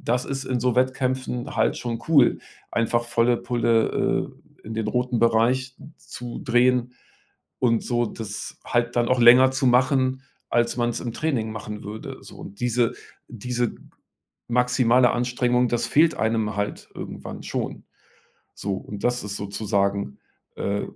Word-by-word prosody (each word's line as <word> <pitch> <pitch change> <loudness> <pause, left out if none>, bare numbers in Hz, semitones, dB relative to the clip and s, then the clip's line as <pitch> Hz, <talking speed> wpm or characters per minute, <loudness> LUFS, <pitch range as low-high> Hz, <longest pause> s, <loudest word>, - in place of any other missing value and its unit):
das 125 +2 0
ist 135 -1 -4
in 125 -2 -1
so 125 -1 +1
Wettkämpfen 130 -1 -1
halt 110 - +2
schon 115 -2 -4
cool, 140 -7 +5 0.3
einfach 120 +1 +1
volle 120 0 +2
Pulle, 115 -2 +1 0.3
äh, - - -16
in 110 - -5
den 110 -1 -2
roten 125 +1 0
Bereich 125 +3 +2 0.2
zu 120 -1 -8
drehen 125 0 +2 0.7
und 115 -3 +2
so 120 -1 0
das 105 -1 -6
halt 120 0 0
dann 120 0 +2
auch 130 -1 +2
länger 125 +2 +8
zu 130 0 0
machen 130 +1 +3 0.3
als 120 0 +1
man's 120 -1 0
im 120 - -4
Training 130 -9 -1
machen 105 -1 -7
würde, 105 +2 -7
so. - - -12
Und 100 +3 -11
diese 120 -1 +1 0.3
diese 120 +1 -2 0.7
maximale 125 0 +3
Anstrengung, 125 0 +1
das 120 0 0
fehlt 160 +5 +4
einem 110 -1 0
halt 105 0 -3
irgendwann - - -7
schon. - - -4 0.7
So, 100 -1 -3
und 100 +1 -8
das 120 -2 0
ist 100 0 -4
sozusagen, 100 -4 -1 0.4
äh, 100 +1 -1
120 Hz, 145 wpm, -24 LUFS, 115-125 Hz, 0.7 s, länger